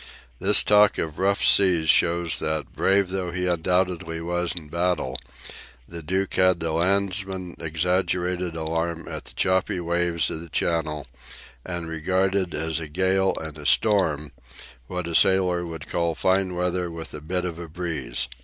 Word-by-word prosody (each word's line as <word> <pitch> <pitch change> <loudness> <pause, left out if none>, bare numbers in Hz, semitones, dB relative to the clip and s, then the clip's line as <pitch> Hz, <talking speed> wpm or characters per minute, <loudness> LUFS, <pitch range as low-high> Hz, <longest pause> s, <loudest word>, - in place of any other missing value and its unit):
This - - +8
talk 105 0 +5
of 80 -2 -4
rough 100 +1 +1
seas 90 -5 +4
shows 85 0 +3
that, 80 -1 -3
brave 95 -1 +2
though 95 -1 -3
he 90 +1 -3
undoubtedly 90 -1 0
was 85 +1 -1
in 80 -4 -8
battle, 85 -5 -1 0.7
the 85 0 -8
Duke 95 +5 -2
had 95 -2 +3
the 80 0 -2
landsman's 95 +1 -1
exaggerated 90 +1 -1
alarm 80 +1 -3
at - - -7
the - - -13
choppy 95 -1 +1
waves 85 -1 0
of 80 - -5
the 85 - -10
Channel, 75 -3 -1 0.6
and 85 -2 -5
regarded 95 +3 0
as 80 +1 -1
a 80 - -6
gale 95 +4 +1
and 80 -1 -7
a 75 - -10
storm 80 -9 +2 0.6
what 90 +2 -4
a 85 - -5
sailor 90 -1 +3
would 80 -1 -8
call 85 -1 -1
fine 95 0 +1
weather 90 0 -1
with 80 -1 -7
a 75 - -7
bit 90 +4 -3
of 85 -2 -5
a 85 - -7
breeze. 80 -8 -2
85 Hz, 160 wpm, -24 LUFS, 80-95 Hz, 0.7 s, This